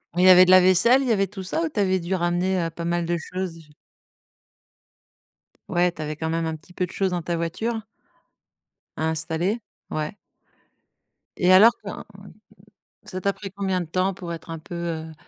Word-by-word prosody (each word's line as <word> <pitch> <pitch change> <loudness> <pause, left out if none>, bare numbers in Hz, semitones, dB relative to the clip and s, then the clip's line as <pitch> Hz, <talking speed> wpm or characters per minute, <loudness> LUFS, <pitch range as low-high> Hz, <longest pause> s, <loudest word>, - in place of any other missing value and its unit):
Il 180 - +2
y 185 - +8
avait 185 0 +9
de 185 - +3
la 185 0 +8
vaisselle, 185 +9 +5
il 270 - -2
y - - +4
avait 195 -3 +2
tout 190 0 -8
ça 190 - -2
ou 325 - -1
tu 260 - -4
avais 190 -1 +2
dû 175 +2 -2
ramener, 175 +1 0
heu, 165 - -1
pas 170 +1 -7
mal 170 0 0
de 170 0 0
choses? 170 -2 -6 2.0
Ouais, 175 +1 +2
tu 165 - -9
avais 155 0 -4
quand 160 +1 -3
même 165 0 -1
un 160 - -2
petit 160 +3 -17
peu 180 - -1
de 180 - -12
choses 190 -2 -1
dans 175 -1 -1
ta 170 +1 -2
voiture? 205 +8 -2 1.2
À 160 0 0
installer? 165 +7 -1 0.3
Ouais. 155 +5 -3 1.2
Et 185 +1 +5
alors 220 +5 +8
quand - - -7 1.0
ça 185 -1 -6
t'a 200 - +1
pris 195 0 -8
combien 190 -1 -2
de 175 - -4
temps 185 +4 0
pour 175 -2 -7
être 165 0 -9
un 165 - -5
peu, 175 - -10
heu, 165 -2 -4
180 Hz, 200 wpm, -24 LUFS, 165-190 Hz, 2.0 s, avait